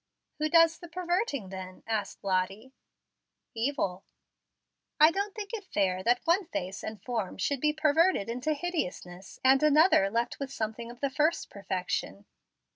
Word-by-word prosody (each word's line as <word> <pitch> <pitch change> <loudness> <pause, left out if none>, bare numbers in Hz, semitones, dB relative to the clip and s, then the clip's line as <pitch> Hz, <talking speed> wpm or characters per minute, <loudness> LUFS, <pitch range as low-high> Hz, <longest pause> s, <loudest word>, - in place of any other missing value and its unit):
"Who 310 0 +1
does 330 0 +5
the 345 - -10
perverting, 345 - -2
then?" 185 -1 -8
asked 220 -2 -3
Lottie. 195 +6 -1 0.8
"Evil." 225 -6 -1 1.0
"I 310 +2 +8
don't 400 +3 -3
think 415 -2 -6
it 435 -3 -4
fair 185 -2 +1
that 240 +4 +2
one 345 +2 +2
face 190 - -4
and 215 -1 -6
form 225 -7 -3
should 270 +7 -1
be 300 - +3
perverted 310 - +2
into 250 +6 -1
hideousness, 195 - -5
and 265 +1 +5
mother 305 - +5
left 235 +3 -1
with 275 -1 -4
something 225 0 -4
of 240 0 -12
the 280 -1 0
first 300 +5 0
perfection." 185 - -3
250 Hz, 150 wpm, -29 LUFS, 195-320 Hz, 1.0 s, I